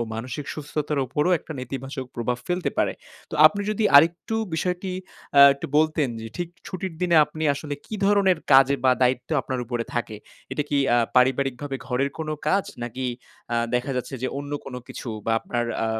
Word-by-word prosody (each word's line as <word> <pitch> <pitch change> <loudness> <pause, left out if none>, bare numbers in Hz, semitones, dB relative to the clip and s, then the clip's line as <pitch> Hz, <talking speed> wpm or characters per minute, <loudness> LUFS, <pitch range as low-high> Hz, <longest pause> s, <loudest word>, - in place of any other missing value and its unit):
মানসিক 125 +5 -5
সুস্থতার 150 -1 -3
উপরও 150 +7 0
একটা 160 - -9
নেতিবাচক 135 +1 -5
প্রভাব 120 +1 -2
ফেলতে 180 0 -1
পারে। - - +2 0.4
তো - - -5
আপনি 205 - +2
যদি 215 +1 0
আরেকটু 170 +8 +4 0.2
বিষয়টি 180 +3 -2 0.4
অ্যা 140 - +10
একটু 140 - -6
বলতেন 155 -3 +2
যে 115 - -6
ঠিক 175 -1 -3 0.2
ছুটির 185 -2 -5
দিনে 175 -2 +3
আপনি 155 +1 -8
আসলে 145 0 -5
কি - - -6
ধরনের 195 -4 +4
কাজে 135 +1 +7
বা 130 - +6
দায়িত্ব 125 0 +1
আপনার 130 0 -3
উপরে 120 -1 -3
থাকে? 120 -3 -2 0.4
এটা 150 - 0
কি 145 - +1
অ্যা 120 - +4 0.2
পারিবারিকভাবে 135 +1 +2
ঘরের 135 +2 0
কোনো 155 -1 -3 0.2
কাজ? 195 +3 +2 0.2
নাকি 120 +2 -4 0.5
আ - - +2 0.2
দেখা 125 +3 0
যাচ্ছে 125 - -1 0.2
যে 130 - +1
অন্য 145 +1 -6
কোনো 125 -2 -6
কিছু? 120 - -7 0.2
বা 115 - +2
আপনার 120 -1 -2 0.2
আ - - 0
140 Hz, 180 wpm, -24 LUFS, 125-160 Hz, 0.5 s, অ্যা